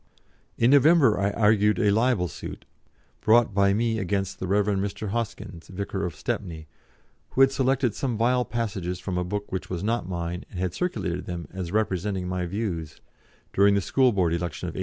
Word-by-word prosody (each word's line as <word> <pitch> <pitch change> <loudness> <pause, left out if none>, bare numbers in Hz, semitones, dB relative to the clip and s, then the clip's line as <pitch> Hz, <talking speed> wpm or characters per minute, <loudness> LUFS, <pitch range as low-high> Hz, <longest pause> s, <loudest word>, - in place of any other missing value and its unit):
In 115 +2 +4
November 140 - +5
I 100 +1 +2
argued 105 0 +3
a 105 -4 +3
libel 110 -4 +2
suit, 75 - -8 0.6
brought 115 -1 +4
by 100 0 +3
me 115 +2 0
against 95 -1 -2
the 95 - -3
Rev. 100 +2 +2
Mr. 100 +1 -2
Hoskyns, 105 -6 -5
vicar 100 0 -3
of 85 - -8
Stepney, 80 -2 -4 0.6
who 135 - +1
had 135 0 +6
selected 130 -3 +1
some 125 -2 -2
vile 125 +2 +2
passages 100 -7 -3
from 90 0 -3
a - - 0
book 105 +3 -4
which 95 0 -4
was 90 0 -4
not 115 -4 -1
mine 85 0 -4
and - - -9
had 90 -1 -1
circulated 90 - -2
them 85 -4 -5
as 90 -2 -5
representing 95 -2 -1
my 90 -1 -2
views, 85 -6 -4 0.5
during 100 +1 +5
the - - +3
School 130 +6 +3
Board 90 -6 +1
election 85 -4 -3
of - - -6
1888. - - -7
100 Hz, 185 wpm, -26 LUFS, 90-115 Hz, 0.6 s, had